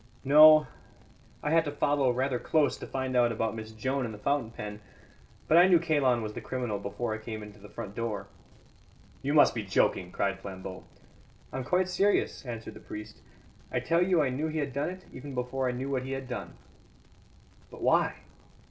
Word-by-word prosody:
"No; 155 +2 +8 0.8
I 150 - 0
had 165 0 +5
to 145 - -2
follow 145 -2 +1
rather 125 +1 0
close 155 +1 +2
to - - -8
find 130 -1 -3
out 120 -1 +4
about 115 0 -1
Miss 110 -1 -7
Joan 130 +5 -2
and 115 - -3
the 105 - -8
fountain 140 +1 0
pen. 105 -2 -7 0.7
But 165 - +6
I 180 - +7
knew 180 -2 +6
Kalon 145 -8 +2
was 105 -1 -5
the - - -6
criminal 120 -6 -3
before 105 +3 -3
I 110 - -4
came 110 -1 -6
into 105 0 -12
the 105 +1 -13
front 105 -4 -7
door." 115 -2 -3 1.0
"You 140 +3 -1
must 150 - +6
be 115 - -2
joking!" 95 -2 +1
cried 100 0 -1
Flambeau. 95 -1 -8 0.7
"I'm 130 - -3
quite 180 +7 +1
serious," 195 -1 +1
answered 115 -2 -6
the - - -11
priest. 105 0 -9 0.5
"I - - 0
tell 170 +1 +1
you 180 -3 +3
I 135 - +1
knew 145 +5 -2
he 160 0 -3
had 145 -3 -2
done 140 +4 -1
it, 185 0 -9
even 135 +1 -8
before 125 +1 -1
I - - 0
knew 130 +3 -4
what 130 -2 0
he 135 +1 -5
had 135 -1 -5
done." 125 - -6 1.1
"But - - -10
why?" - - +3
130 Hz, 200 wpm, -29 LUFS, 110-145 Hz, 1.1 s, No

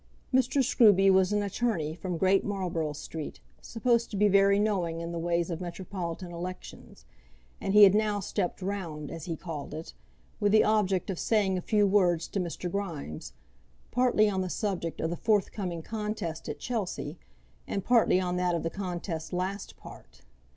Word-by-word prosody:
Mr. 260 +1 +3
Scruby 205 -6 +5
was 190 0 +4
an 205 0 +1
attorney 200 -6 -1
from 175 +1 -4
Great 190 +2 +3
Marlborough 175 -6 -2
Street, 150 +1 -7 0.2
supposed 235 0 0
to 205 - -5
be 210 +1 +4
very 200 0 +5
knowing 185 -6 0
in 170 0 -5
the 170 - -3
ways 170 +1 0
of 170 +1 -4
metropolitan 175 0 -5
elections; 180 +2 -8 0.6
and 195 - -1
he 210 - +10
had 195 -2 +8
now 210 -1 +1
stepped 190 -1 -3
round, 170 -7 -4
as 165 - -7
he 165 - -3
called 155 -3 -6
it, 160 +1 -7 0.5
with 205 -1 +2
the 215 - +7
object 200 -3 +1
of 180 - -5
saying 205 -4 +2
a 180 - -2
few 210 +2 +2
words 180 -4 +3
to 200 - -3
Mr. 180 0 -3
Grimes, 170 - -5 0.6
partly 245 -3 +3
on 190 -2 0
the 185 - -3
subject 180 -5 -3
of 160 - -1
the - - -1
forthcoming 195 -5 0
contest 210 -7 -4
at 150 - -4
Chelsea, 185 -9 -4 0.5
and 195 - -3
partly 235 -6 +4
on 180 -1 -1
that 180 -1 +1
of 165 - -2
the 165 - -2
contest 175 -4 -4
last 190 +2 -3
past. 60 +1 -14
185 Hz, 175 wpm, -29 LUFS, 170-205 Hz, 0.6 s, he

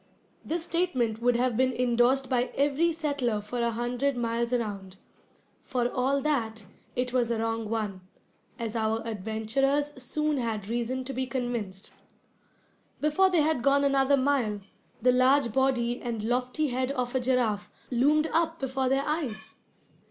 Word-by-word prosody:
This 330 +1 -2
statement 255 -11 0
would 245 0 +3
have 245 0 +1
been 260 +2 +3
indorsed 250 +2 +2
by 250 -2 +1
every 290 +4 +2
settler 285 -9 -1
for 210 +4 -5
a 235 - +2
hundred 245 +4 -1
miles 235 0 -1
around. 205 -6 -3 0.7
For 245 -2 0
all 270 +2 +1
that, 225 -8 -1 0.3
it 250 0 -1
was 245 -2 +2
a 235 - 0
wrong 225 -1 -2
one, 210 -4 -2 0.6
as 230 -1 -4
our 220 0 0
adventurers 230 +7 0
soon 300 +3 0
had 220 -5 -2
reason 240 +3 -2
to 270 +1 -5
be 260 0 -2
convinced. 235 -6 -4 1.1
Before 305 +6 +3
they 350 -4 +3
had 310 -5 +1
gone 280 +2 +3
another 275 0 +3
mile, 260 -7 +1 0.4
the 250 - +6
large 255 -1 +3
body 245 -2 +1
and 230 -3 -3
lofty 250 +6 0
head 255 +1 -1
of 250 -2 -2
a 260 - +2
giraffe 245 -5 0 0.2
loomed 290 +5 +3
up 330 0 +1
before 265 -1 -1
their 270 +1 +1
eyes! 230 -9 -3
250 Hz, 150 wpm, -28 LUFS, 230-275 Hz, 1.1 s, the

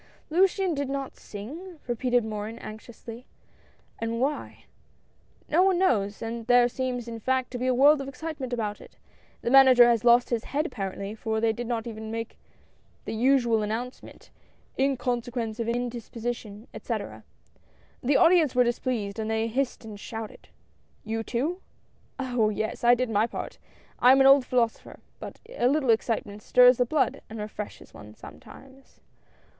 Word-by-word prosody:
'^Luciane 375 +1 +2
did 285 -2 -3
not 275 -1 -4
sing?" 310 - -9
repeated 245 -1 0
Morin 215 +1 -5
anx 215 -2 -10
iously, 235 +1 -11 0.4
" - - -34
and 230 0 -2
why? 285 +4 -3 0.4
" - - -36
"No 330 +4 +3
one 380 -1 +3
knows, 215 - +1
and 230 0 -5
there 245 -1 +5
seems, 245 -1 -3
in 230 -1 -6
fact, 260 +2 -1
to 245 - -5
be 255 - -1
a 255 - +3
world 285 +3 +5
of 270 - -6
excitement 275 -1 -6
about 215 -4 -3
it. - - -16 0.5
The 235 - -1
Manager 260 -2 +8
has 235 -2 +2
lost 240 +1 +4
his 230 -2 -1
head 295 +3 -1
apparently, 200 - -5
for 220 0 -2
they 225 0 +2
did 240 +1 -5
not 230 -1 -2
even 220 -1 -7
make 230 0 -6 0.7
the - - -4
usual 240 -1 +2
announcement 225 +4 -6 0.2
— - - -37
'in 270 0 +1
consequence 240 -2 -3
of 230 - -2
indisposi 240 0 -3
tion,' 210 0 -12
etc. - - -5 0.8
The 270 +3 +2
audience 335 -6 +4
were 250 - +5
displeased, 235 -4 -2
and 220 0 -3
they 220 0 0
hissed 245 +1 -2
and 210 -2 -9
shouted 220 0 -8 0.3
" - - -38
"You 225 - -1
too?" 290 +12 -2 0.3
" - - -37
Oh! 245 -5 +1
yes, 215 +2 -4
I 240 +1 +6
did 250 -1 -2
my 215 +2 +2
part. - - -7 0.4
I 250 +1 +7
am 270 - +4
an 270 - +5
old 270 -1 +6
philosopher, 235 -3 -1 0.2
but - - -9
a 465 - 0
little 270 -2 +2
excitement 220 -2 -1
stirs 250 +2 +6
the 245 - +2
blood, 275 0 0
and 225 - -8
refreshes 210 0 -7
one 105 +1 -13
sometimes 260 - -15
240 Hz, 175 wpm, -26 LUFS, 225-265 Hz, 0.8 s, Manager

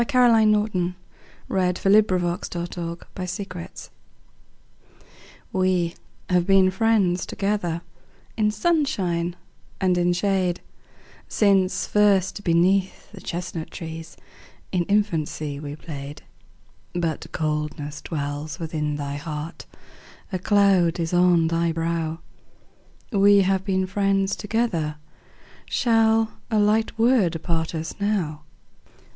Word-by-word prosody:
Caroline 240 -5 +5
Norton 195 -4 0 0.5
We 190 - -1
Have 180 -1 0
Been 205 +2 +7
Friends 180 -4 -1
Together 170 -1 -4 2.6
WE 185 -2 +1 0.3
have 180 -1 +2
been 190 -1 +5
friends 190 -3 +2
together 195 -5 -1 0.5
In 215 -2 +2
sunshine 205 - 0 0.4
and 185 -2 +2
in 175 0 +2
shade, 180 -1 0 0.7
Since 195 -3 +2
first 205 -1 +2
beneath 185 +2 +1
the - - -11
chestnut 170 -2 -5
trees, 165 -1 -8 0.5
In 180 -2 0
infancy 160 -8 -1
we 145 -1 -6
played. 145 -2 -8 0.7
But 165 -3 -2
coldness 150 -1 -3
dwells 145 -1 -4
within 155 -2 -2
thy 145 -1 -4
heart, 150 +1 -6 0.7
A 185 - 0
cloud 190 -4 +3
is 165 +1 -2
on 175 -2 +4
thy 165 +1 +1
brow; 165 0 -2 0.9
We 200 -1 +5
have 190 0 +1
been 190 -1 0
friends 195 0 +1
together, 210 -9 -1 0.7
Shall 225 -1 +3 0.2
a 220 - +1
light 210 +2 +2
word 225 -8 +3
part 165 -1 -1
us 160 0 -4
now? 190 -8 -1
180 Hz, 105 wpm, -24 LUFS, 165-200 Hz, 2.6 s, Been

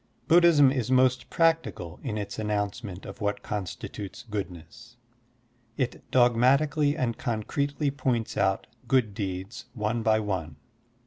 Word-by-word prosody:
Buddhism 165 -5 +6
is 125 -3 -2
most 130 -1 +3
practical 160 - 0
in 110 -6 -3
its 100 0 -5
announcement 105 -2 -3
of - - -9
what 105 0 -1
consti 100 -5 -4
tutes 100 0 -8
goodness. 105 +4 -7 0.8
It 130 -2 -2
dogmatically 140 +5 +3
and 115 -3 -1
concretely 140 +5 -1
points 125 -5 -1
out 95 0 +1 0.2
good 125 -5 +2
deeds 100 +2 -5
one 110 +1 -1
by 110 0 +3
one. 95 -8 -3
115 Hz, 125 wpm, -27 LUFS, 105-130 Hz, 0.8 s, Buddhism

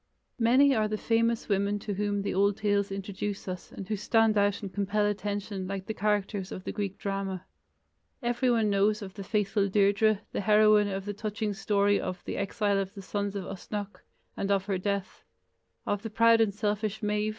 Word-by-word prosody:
Many 260 +5 +5
are 215 -3 +2
the 215 0 -2
famous 230 +1 +1
women 200 0 +1
to 205 0 -4
whom 205 0 -1
the - - -2
old 200 +1 +2
tales 205 -2 +1
introduce 195 +1 -4
us 180 -1 -6
and 195 - -8
who 215 - -1
stand 225 +1 +3
out 205 0 +2
and 195 -2 -6
compel 205 +2 0
attention 205 -1 -3
like 195 0 -4
the 220 - -3
characters 205 -2 -1
of 185 - -6
the - - -4
Greek 200 -1 -3
drama. 195 -2 -3 0.8
Everyone 240 -3 +2
knows 205 +2 +2
of 190 -1 -8
the 200 - -7
faithful 200 0 0
Deirdre, 205 +1 +3
the - - -2
heroine 210 0 +5
of 195 -1 -4
the 205 - -3
touching 210 0 -3
story 205 0 +2
of 185 - -5
the - - -4
"Exile 200 0 0
of 195 +2 -4
the 195 - -8
Sons 200 +1 -3
of 195 - -3
Usnech", 200 +2 -6 0.4
and 195 - -2
of 195 -1 +2
her 195 -2 -1
death; 200 -1 -3 0.6
of 205 -1 -1
the 225 - -5
proud 230 +1 +5
and 220 -2 +3
selfish 210 +1 -2
Medb. 210 0 0
205 Hz, 195 wpm, -28 LUFS, 195-215 Hz, 0.8 s, Many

